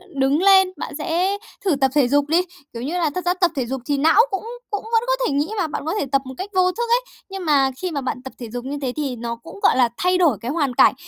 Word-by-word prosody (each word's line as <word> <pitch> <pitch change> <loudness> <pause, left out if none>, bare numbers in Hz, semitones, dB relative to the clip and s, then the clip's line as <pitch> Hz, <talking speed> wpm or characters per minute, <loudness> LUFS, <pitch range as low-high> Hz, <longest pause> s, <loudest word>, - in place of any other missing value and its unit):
đứng 275 +2 +2
lên, 380 -1 +6
bạn - - -6
sẽ 355 +5 0 0.3
thử 360 -6 +3
tập 270 -1 +1
thể 285 -4 +4
dục 285 +2 +2
đi. 330 +4 +3 0.3
Kiểu 230 - -6
như 315 +7 -2
là, 335 -3 +1
thật 365 - -3
ra 355 - +3
tập 360 -1 +1
thể 260 -3 -1
dục 265 +2 -4
thì 285 +1 0
não 315 +4 +5
cũng 385 - -2 0.3
cũng 410 - -3
vẫn 455 0 +1
có - - +3
thể - - -1
nghĩ 290 +2 +1
mà, 360 -5 0
bạn 300 - -5
có 325 - -1
thể - - -1
tập 275 -1 +3
một 260 - -7
cách 395 +2 -5
vô 365 0 +4
thức 470 +6 -3
ấy. 480 +1 +4 0.3
Nhưng 385 -2 -6
mà 275 -3 +3
khi 365 -1 -2
mà 285 -3 -2
bạn 255 -1 -4
tập 265 - -8
thể 235 -3 -7
dục 245 +2 -6
như 285 +2 -4
thế 260 -2 -1
thì 280 -4 -2
nó 235 0 -4
cũng, 230 -4 -13
gọi - - +4
là, 245 -2 +4
thay 365 0 +2
đổi 320 - +3
cái 240 - -3
hoàn 290 -5 0
cảnh - - +6
295 Hz, 300 wpm, -21 LUFS, 265-365 Hz, 0.3 s, lên